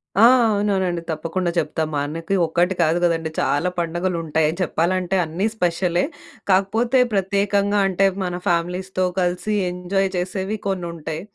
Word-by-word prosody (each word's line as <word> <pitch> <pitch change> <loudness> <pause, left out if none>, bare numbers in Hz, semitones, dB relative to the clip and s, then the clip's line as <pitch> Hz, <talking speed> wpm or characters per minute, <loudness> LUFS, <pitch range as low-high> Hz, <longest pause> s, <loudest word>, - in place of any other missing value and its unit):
ఆ! 220 +4 +7 0.2
అవునవునండి. 195 -4 0
తప్పకుండా 170 +3 -2
చెప్తా. 160 - -1
మనకి 165 +6 -2
ఒక్కటి 175 +3 +1
కాదు 165 +1 +3
కదండి, 165 -2 +1
చాలా 175 +5 +1
పండగలుంటాయని 165 -2 -1
చెప్పాలంటే, 180 +3 0
అన్నీ 170 +6 -2
స్పెషలే. 175 0 +1 0.5
కాకపోతే, 225 +7 +2
ప్రత్యేకంగా 200 +1 +1
అంటే, 195 +1 +2 0.2
మన 180 -1 -3
ఫ్యామిలీస్‌తో 180 +2 0
కలిసి 180 +4 -1 0.2
ఎంజాయ్ 190 +2 -1
చేసేవి 190 +3 -2
కొన్నుంటాయి. 170 -4 -4
180 Hz, 115 wpm, -21 LUFS, 170-195 Hz, 0.5 s, ఆ